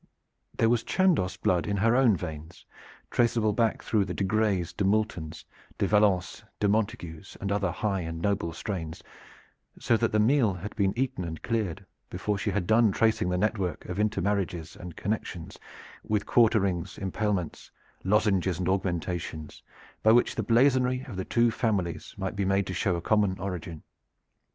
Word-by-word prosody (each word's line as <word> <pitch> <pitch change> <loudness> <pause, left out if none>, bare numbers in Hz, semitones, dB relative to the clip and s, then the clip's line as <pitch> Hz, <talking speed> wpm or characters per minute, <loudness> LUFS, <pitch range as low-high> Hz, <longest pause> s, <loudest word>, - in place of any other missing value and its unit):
There 115 - +3
was 115 0 +2
Chandos 175 - +1
blood 90 -1 +1
in 100 -1 0
her 115 +4 +3
own 125 -7 +4
veins, 80 +2 -8 0.5
traceable 115 -3 +2
back 115 0 0
through 105 -3 +1
the - - -5
de - - -1
Greys, 95 -4 0
de 100 - -2
Multons, 95 -6 -1 0.3
de - - +1
Valences, 105 -4 +2 0.2
de 105 - +2
Montagues 100 -5 -2
and 100 0 -3
other 100 -2 +1
high 100 +1 -1
and 80 -1 -5
noble 100 -2 0
strains, 80 -2 -5 0.7
so 120 - +2
that 115 0 0
the 110 - +2
meal 115 -3 +3
had 100 +4 -7
been 100 -2 +2
eaten 130 -6 -1
and 80 -2 -6
cleared 110 -8 -2 0.2
before 100 +3 -2
she 105 - -1
had 100 -2 -1
done 110 +1 +4
tracing 110 -2 +1
the 90 - 0
network 95 -2 -1
of 90 +2 -5
intermarriages 100 -5 -1
and 90 -3 -9
connections, 95 -5 -4 0.4
with 105 -1 -1
quarterings, 100 -7 +2
impalements, 95 -2 -2 0.3
lozenges 95 -3 +2
and 90 - -2
augmentations 85 -4 -3 0.4
by 110 - +5
which 120 +2 +4
the - - -2
blazonry 125 +1 +3
of 115 - -7
the 95 - -3
two 120 0 +2
families 100 -7 -2
might 95 +2 -3
be 100 - -1
made 95 +1 +1
to 95 - -4
show 90 +1 0
a 85 - -3
common 100 0 +2
origin. 90 -4 -5
100 Hz, 165 wpm, -28 LUFS, 90-110 Hz, 0.7 s, by